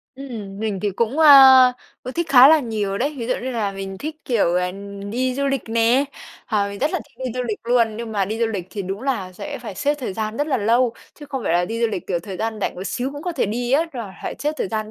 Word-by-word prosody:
Ừm, 225 -8 -8
mình 210 -3 -2
thì 205 - 0
cũng, 235 +8 -1
à, 265 -4 +9 0.3
ừ, 255 - -5
thích 340 +1 -2
khá 265 -1 +8
là 315 0 +6
nhiều 210 -5 -2
đấy. 285 +5 -1
Ví 230 - -4
dụ 250 - +1
như 260 - -3
là 220 -5 -2
mình 195 0 -6
thích, 310 +5 -5
kiểu, 210 -8 +1
ờ, 180 0 +1 0.4
đi 255 +3 -1
du 280 +1 -1
lịch 275 -4 -2
nè, 230 +4 +3 0.4
ờ, 205 -3 0
mình 200 0 -7
rất 295 +7 +1
là 365 - -1
thích 280 - -30
đi - - -2
du 250 - -1
lịch 225 -4 -3
luôn. 230 -2 +2
Nhưng 230 -1 -6
mà 200 -2 +1
đi 215 +4 -4
du 230 - +2
lịch 200 -6 -4
thì 205 - -4
đúng 195 +4 -5
là 220 -9 -2
sẽ 285 +9 -7
phải 225 -5 -8
xếp 290 +7 0
thời 260 -9 -5
gian 215 +2 -4
rất 290 - 0
là 290 - +1
lâu, 235 +3 +2 0.2
chứ 295 - -12
không 270 -3 -4
phải - - +1
là 175 +1 +3
đi 225 +5 -4
du 235 - +3
lịch, 210 -5 -5
kiểu, 175 - -1
thời 185 +2 -7
gian 220 +1 -3
rảnh - - -2
một 185 - -7
xíu 255 +5 -2
cũng 290 +1 -8
có 355 - -3
thể 290 - 0
đi 240 +4 -2
á, 300 +4 +4
là 230 -7 -6
phải - - -4
xếp 300 +1 -1
thời - - -1
gian 215 0 -3
230 Hz, 285 wpm, -21 LUFS, 205-270 Hz, 0.4 s, à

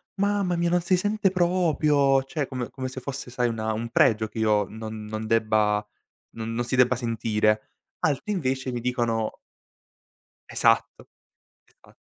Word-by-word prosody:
"Mamma 200 -2 +1
mia 170 0 +1
non 175 +1 +2
si 180 +2 +2
sente 205 0 +1
proprio", 155 -7 +2
cioè 140 +1 -3
come 125 -3 -4
come 130 -1 -5
se 130 - -7
fosse 135 -1 -6
sai 120 0 0
una 110 -1 -2
un 115 +2 -4
pregio 110 -2 +3
che 110 - -8
io 105 -2 +3
non 110 0 -7
non 110 +1 -5
debba 110 -2 +2 0.5
n 115 - -5
non 120 +1 -1
si 120 +1 -1
debba 125 0 +4
sentire. 110 -2 0 0.3
Altri 160 +8 0
invece 130 -7 -1
mi 120 - -3
dicono 120 -3 -1 1.1
Esatto. - - +1 0.8
Esa - - -20
125 Hz, 155 wpm, -25 LUFS, 110-155 Hz, 1.1 s, debba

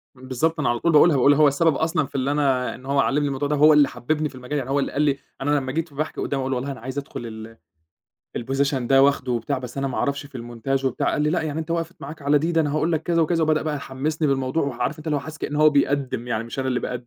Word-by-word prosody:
بالضبط، 130 +6 -2
أنا 150 - +1
على 120 0 0
طول 170 - +2
باقولها، 155 0 +6
باقول 135 +2 +5
هو 150 +1 +5
السبب 145 +2 +2
أصلًا 160 0 0
في 145 +1 -15
اللي 135 +1 0
أنا 135 -4 +1
إن 130 - -14
هو 140 +1 0
علّمني 145 +1 +2
الموضوع 140 +1 -2
ده، 150 - 0
هو 150 +2 +6
اللي 145 -2 +6
حببني 155 +4 -2
في 130 - -15
المجال، 130 +3 -4
يعني 135 -2 -4
هو 140 +1 +1
اللي 140 - -1
قال 145 - -1
لي 145 -2 +2 0.2
أنا 145 +2 +2
لمّا 130 -1 -4
جيت 165 -2 -3
باحكي 155 +3 -3
قدامه 140 -1 -2
أقول: 135 0 -1
"والله 130 +3 -3
أنا 135 - -8
عايز 130 +4 -7
أدخل 140 -3 -5
ال 110 0 -9 0.8
الPosition 135 +3 0
ده 135 +1 +3
واخده 140 -2 +2
وبتاع 120 +1 -1
بس 125 +1 -8
أنا 135 - -1
ما 130 - -5
أعرفش 140 0 -1
في 140 -2 -9
الmontage 120 +3 -3
وبتاع"، 130 - 0
قال 150 - 0
لي: 150 - +2
"لأ، 170 0 0
يعني 155 -1 -3
أنت 160 +1 -7
وقفِت 165 +1 -2
معاك 145 +2 -9
على 145 +1 +3
دي؟ 165 +4 -1
ده 165 - +3
أنا 145 -2 0
هاقول 155 +2 +1
لك 160 -1 0
كذا 170 0 +2
وكذا"، 165 +1 +1
وبدأ 155 -1 +2
بقى 155 -1 -2
يحمّسني 145 +3 -2
بالموضوع 135 +3 0
وعارف 140 +1 -2
أنت 155 - -11
اللي 150 - +1
هو - - -1
حاسس 155 +2 -9
كأن 145 - -4
هو 155 0 +6
بيقدّم 140 -4 0
يعني 115 -1 -1
مش 115 +3 -8
أنا 130 0 -1
اللي 125 -1 0
باقدّم. 125 -1 -5
140 Hz, 285 wpm, -23 LUFS, 130-155 Hz, 0.8 s, باقولها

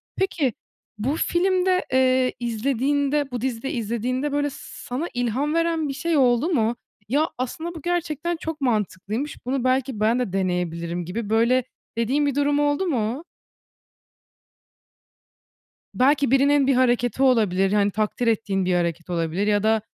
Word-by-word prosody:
Peki 320 - 0 0.4
bu 255 +8 -1
filmde, 365 +2 +1
eee, 255 -1 +3
izlediğinde 275 +4 0
bu 245 -2 -4
dizide 255 0 -3
izlediğinde 245 +5 -2
böyle 290 0 0
s - - -11
sana 265 +8 -5
ilham 245 +4 -1
veren 330 -2 +1
bir 275 - -3
şey 325 +3 0
oldu 250 +3 +3
mu? 235 -8 +1 0.3
"Ya, 300 +6 +2
aslında 320 +7 -4
bu 325 - -8
gerçekten 345 0 -1
çok 320 -2 -5
mantıklıymış, 220 +2 -2
bunu 260 0 -1
belki 255 -2 0
ben 225 +3 +2
de 245 -7 -2
deneyebilirim." 175 -2 -2
gibi 205 +5 -4
böyle 235 +3 +3 0.3
dediğin 260 +6 +1
bir 285 -2 0
durum 290 0 +2
oldu 290 +5 +1
mu? 250 -3 -1 2.7
Belki 280 +1 +3
birinin 275 +1 +4
bir 275 - +3
hareketi 245 0 +2
olabilir, 205 -7 +3
hani, 205 -1 +3
takdir 215 +4 -1
ettiğin 205 -4 +1
bir 180 0 +1
hareket 170 -1 -1
olabilir 170 +3 -1
ya 205 -1 +2
da, 220 0 +3
255 Hz, 145 wpm, -23 LUFS, 215-290 Hz, 2.7 s, birinin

